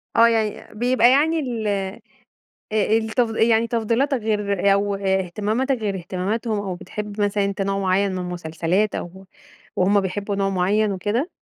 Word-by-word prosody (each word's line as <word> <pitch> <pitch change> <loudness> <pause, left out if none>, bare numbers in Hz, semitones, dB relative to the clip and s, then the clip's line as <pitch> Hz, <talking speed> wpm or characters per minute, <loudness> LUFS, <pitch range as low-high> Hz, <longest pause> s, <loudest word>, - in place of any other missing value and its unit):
آه، 230 0 +7
يعني 220 -3 -1
بيبقى 245 +1 +4
يعني 315 +4 +3
ال 235 -6 -3
آآ 195 -1 -2 0.7
آآ، 215 +1 +2
التف 225 +2 0
يعني 225 0 +3
تفضيلاتك 235 +5 +1
غير 200 -3 +1
أو 200 0 0
إهتماماتك 200 +7 0
غير 210 -3 -2
إهتماماتهم 200 +5 -2
أو 195 -3 -4
بتحب 210 +3 -6
مثلًا 205 0 +1
أنت 200 0 -3
نوع 195 0 0
معين 195 +1 +1
من 185 - -3
المسلسلات 180 +2 -1
أو 190 +2 -7 0.5
وهُم 200 +2 +3
بيحبوا 200 +2 -3
نوع 195 0 +1
معين 200 +3 +1
وكده؟ 210 - -1
205 Hz, 150 wpm, -22 LUFS, 195-225 Hz, 0.7 s, آه